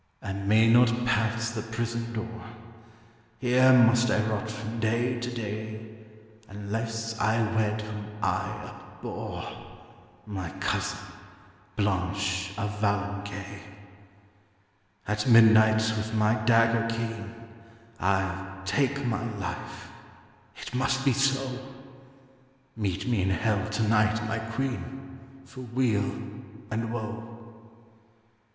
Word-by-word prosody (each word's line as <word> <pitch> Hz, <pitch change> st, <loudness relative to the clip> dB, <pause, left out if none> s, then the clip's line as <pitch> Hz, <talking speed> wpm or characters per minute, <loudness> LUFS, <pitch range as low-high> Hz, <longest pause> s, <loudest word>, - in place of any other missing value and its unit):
'I 100 Hz, -, -3 dB
may 105 Hz, +3 st, +3 dB
not 120 Hz, +1 st, +5 dB
pass 115 Hz, 0 st, +1 dB
the 115 Hz, -2 st, -3 dB
prison 115 Hz, +1 st, -3 dB
door; 115 Hz, -1 st, -5 dB, 0.9 s
Here 130 Hz, +2 st, +5 dB
must 120 Hz, -1 st, +6 dB
I 110 Hz, 0 st, +3 dB
rot 110 Hz, 0 st, -2 dB
from 110 Hz, +1 st, -5 dB
day 120 Hz, +2 st, +1 dB
to 120 Hz, +1 st, -3 dB
day, 110 Hz, -1 st, -5 dB, 0.6 s
Unless 115 Hz, +3 st, -4 dB
I 110 Hz, +2 st, +2 dB, 0.2 s
wed 110 Hz, 0 st, +1 dB
whom 105 Hz, -1 st, -6 dB
I -, -, -2 dB, 0.2 s
abhor, -, -, -5 dB, 0.8 s
My 95 Hz, -5 st, -4 dB
cousin, -, -, -1 dB, 0.8 s
Blanche 95 Hz, -1 st, 0 dB
of 105 Hz, -1 st, -1 dB
Valencay. 100 Hz, -1 st, -2 dB, 1.5 s
'At 105 Hz, +2 st, 0 dB
midnight 110 Hz, -2 st, +6 dB
with 110 Hz, +1 st, -3 dB
my 110 Hz, 0 st, +4 dB
dagger 115 Hz, 0 st, +4 dB
keen, 115 Hz, -1 st, -4 dB, 0.6 s
I'll 95 Hz, 0 st, -1 dB
take 140 Hz, +6 st, +1 dB
my 120 Hz, -2 st, -1 dB
life; 90 Hz, -3 st, -6 dB, 0.7 s
it -, -, -7 dB
must 135 Hz, +2 st, +1 dB
be 135 Hz, -, +5 dB
so. 135 Hz, -1 st, +1 dB, 1.2 s
Meet 100 Hz, -3 st, -2 dB
me 120 Hz, -6 st, +2 dB
in 95 Hz, -, +1 dB
hell 105 Hz, +1 st, +1 dB
to 105 Hz, +1 st, 0 dB
night, 105 Hz, 0 st, +3 dB
my 115 Hz, +1 st, -1 dB
queen, 135 Hz, +3 st, -4 dB, 0.3 s
For 130 Hz, -1 st, -10 dB
weal 120 Hz, -4 st, +1 dB, 0.6 s
and 115 Hz, +1 st, -2 dB
woe.' 115 Hz, 0 st, -5 dB
110 Hz, 110 wpm, -28 LUFS, 105-115 Hz, 1.5 s, must